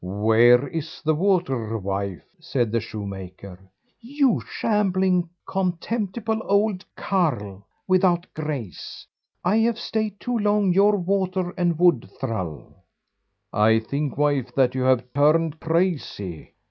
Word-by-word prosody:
"Where 110 +7 +4
is 165 +4 -6
the 155 - +3
water, 150 - 0
wife?" 100 -2 -4 0.2
said 135 -9 -1
the 115 - +1
shoemaker. 95 -3 -8 0.4
"You 270 0 +1
shambling, 190 -4 +1 0.2
contemptible 205 +4 -2
old 200 -1 +1
carle, 115 - -1 0.2
without 185 -2 +3
grace, 145 - -6 0.4
I 190 +5 +2
have 230 0 +2
stayed 215 -4 -3
too 245 -1 -2
long 205 -3 +2
your 205 +3 +4
water 185 -1 -1
and 175 -3 0
wood 170 -8 +3
thrall." 95 - -5 0.7
"I 110 +1 +4
think, 140 +6 -3
wife, 140 -4 0
that 130 -2 +3
you 130 - -2
have 130 -2 +3
turned 155 +2 +2
crazy. 160 - -2
165 Hz, 120 wpm, -23 LUFS, 115-190 Hz, 0.7 s, Where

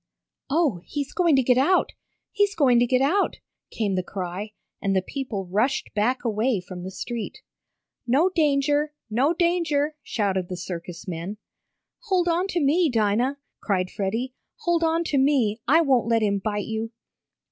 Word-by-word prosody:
"Oh, 280 - +1
he's 285 -2 -4
going 340 -5 +3
to 265 - +3
get 250 +1 +4
out! 360 +8 +3 0.4
He's 410 -2 +1
going 255 -6 +4
to 240 - +3
get 255 +2 +2
out!" 370 +9 +1 0.3
came 210 -3 -1
the 185 - +1
cry 190 +3 -5 0.3
and 195 -1 0
the 190 - +2
people 230 -6 -4
rushed 215 +9 0
back 245 +5 0
away 225 0 +1
from 180 0 -9
the 185 - -5
street. 230 +4 -6 0.6
"No 280 +9 +4
danger! 295 -2 +1 0.2
No 260 +8 +3
danger!" 335 -4 +1
shouted 190 -7 -1
the 180 - -4
circus 175 0 -7
men. 180 +4 -5 0.7
"Hold 370 -4 +1
on 345 +3 +1
to 360 - -1
me, 320 +3 +3
Dinah!" 235 +4 +1 0.2
cried 185 -3 -1
Freddie. 225 +6 -2 0.3
"Hold 345 -4 +1
on 330 +1 +2
to 290 -4 0
me. 255 -6 +2
I 320 +6 +6
won't 265 -7 +2
let 230 -1 +2
him 200 -1 +1
bite 205 +1 -2
you!" 225 0 -3
250 Hz, 165 wpm, -24 LUFS, 205-300 Hz, 0.7 s, I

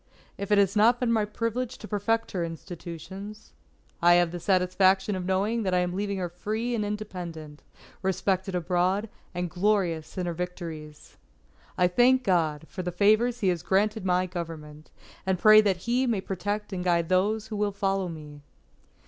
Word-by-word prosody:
If 200 +1 -6
it 205 - +5
has 200 0 +3
not 230 +4 +4
been 245 -2 +1
my 220 -2 +2
privilege 230 +3 -3
to 215 - -10
perfect 225 +3 -1
her 180 -3 -2
institutions, 175 +5 -8 0.5
I 175 0 +6
have 175 -1 +3
the 175 - -5
satisfaction 190 +2 +2
of 180 -1 -4
knowing 205 +5 +1
that 185 -3 0
I 180 - +3
am 180 0 -2
leaving 200 +1 -2
her 180 -1 -2
free 215 +7 -3
and 220 -3 0
independent, 175 -8 -6 0.4
respected 190 0 -1
abroad, 180 +4 0 0.3
and 180 0 -1
glorious 180 -3 0
in 180 - -1
her 175 - -2
victories._ 165 -4 -7 0.6
_I 180 - +4
thank 255 +4 +4
God 160 -6 +1
for 185 - -6
the 180 0 -3
favours 215 +6 +3
He 195 - +3
has 175 -2 -1
granted 205 +4 +1
my 180 0 +2
Government, 160 -4 -7 0.3
and 190 -1 0
pray 215 +3 +8
that 190 -4 0
He 250 +2 +1
may 225 -4 +1
protect 205 +2 -4
and 180 -1 -3
guide 170 -2 +2
those 205 +4 +1
who 215 - -4
will 205 0 0
follow 195 -2 -1
me. 150 -3 -10
190 Hz, 175 wpm, -27 LUFS, 175-210 Hz, 0.6 s, pray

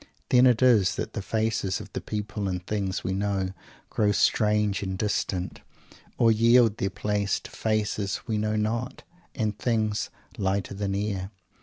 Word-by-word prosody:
Then 125 0 +6
it 125 0 +3
is 110 -8 +5
that - - -4
the - - -3
faces 110 -2 -1
of - - -11
the - - -3
people 105 -1 -4
and 90 -1 -3
things 100 -3 -2
we 95 - -1
know 100 -1 -1 0.4
grow 105 -1 +2
strange 105 -1 +2
and 95 -1 -3
distant, 95 -3 -2 0.6
or 115 -1 +5
yield 115 0 +5
their 95 - 0
place 100 +1 -1
to - - -11
faces 105 -2 -1
we 110 -2 -1
know 110 0 0
not 115 +3 -2 0.3
and 110 -5 -2
things 110 -3 0 0.3
"lighter 95 0 -1
than 100 -1 -2
air." 100 -2 -2
105 Hz, 160 wpm, -26 LUFS, 100-110 Hz, 0.6 s, Then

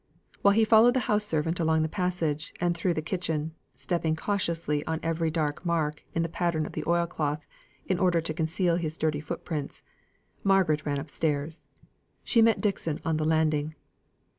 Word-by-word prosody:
While 200 0 +5
he 225 0 +5
followed 225 +3 +6
the 260 - +2
house 210 -1 +1
servant 165 -1 -1
along 160 -1 +2
the - - +1
passage, 165 -4 -2
and 175 0 +1
through 170 +1 0
the 155 - -2
kitchen, 160 -3 -2 0.2
stepping 160 +4 -1
cautiously 165 -5 -1
on 160 0 -1
every 165 0 0
dark 155 -1 -2
mark 160 -4 -1
in 165 - +2
the - - -1
pattern 165 -2 -1
of - - -7
the 155 - -4
oil 170 0 +3
cloth, 150 -3 -3 0.4
in 185 -1 0
order 180 -3 +3
to 160 -1 -2
conceal 165 +2 +1
his 160 -2 -3
dirty 155 -2 0
foot 150 - -6
prints, 150 -4 -4 0.6
Margaret 185 -7 +3
ran 145 -1 0
upstairs. 150 +2 -2 0.6
She 230 - +4
met 225 0 +4
Dixon 185 -7 -1
on 160 -1 +1
the 155 - -1
landing. 155 -1 +1
160 Hz, 180 wpm, -28 LUFS, 155-180 Hz, 0.6 s, followed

